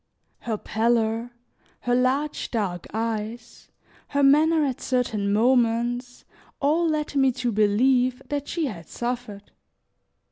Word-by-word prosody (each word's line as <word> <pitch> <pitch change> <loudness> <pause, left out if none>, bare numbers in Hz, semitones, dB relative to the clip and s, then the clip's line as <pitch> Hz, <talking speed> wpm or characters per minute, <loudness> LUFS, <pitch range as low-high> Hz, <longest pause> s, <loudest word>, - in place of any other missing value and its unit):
Her 225 -3 -3
pallor, 225 +1 0 0.5
her 245 - 0
large 265 +4 0
dark 195 -7 -3
eyes, 225 +2 -4 0.4
her 285 0 0
manner 305 +3 +5
at 265 -3 -3
certain 220 -6 0
moments, 240 +2 +1 0.3
all 315 +4 +2
led 305 -1 -2
me 270 -1 +4
to 240 0 -2
believe 245 +5 +2
that 290 -1 -3
she 335 -2 -1
had 175 - -7
suffered. 240 -4 -5
245 Hz, 115 wpm, -24 LUFS, 220-270 Hz, 0.5 s, manner